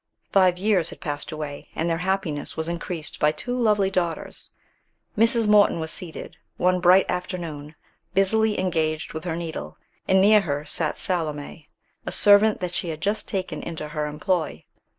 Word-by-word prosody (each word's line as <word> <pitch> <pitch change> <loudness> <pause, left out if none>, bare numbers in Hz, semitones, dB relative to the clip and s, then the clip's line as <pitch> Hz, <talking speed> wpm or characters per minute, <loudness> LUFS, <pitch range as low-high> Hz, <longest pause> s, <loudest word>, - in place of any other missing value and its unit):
Five 185 -2 +4
years 185 -4 +1
had - - -10
passed 145 -3 -4
away, 150 -2 -6
and 165 - -1
their 165 -1 0
happiness 180 -5 -2
was 160 0 -2
increased 170 -1 -5
by 150 - +4
two 245 +10 -4
lovely 210 -5 +2
daughters. 175 -3 -3 0.7
Mrs. 230 0 +3
Morton 210 -4 +5
was 160 0 -3
seated, 170 -3 -7 0.2
one 180 0 +2
bright 180 +2 +5
afternoon, 165 -5 -5 0.4
busily 215 +3 +3
engaged 160 -4 -1
with 160 +2 -6
her 165 -2 -2
needle, 165 -1 -6 0.3
and 190 - +4
near 210 +2 +6
her 145 -5 -3
sat 155 +1 -2
Salome, 155 -3 -3 0.4
a - - -2
servant 205 0 +6
that 180 -1 -3
she 175 - -2
had 155 -1 -5
just 205 +5 -2
taken 190 -2 -3
into 155 -2 -6
her 150 -1 -2
employ. 155 - -2
175 Hz, 165 wpm, -24 LUFS, 155-195 Hz, 0.7 s, near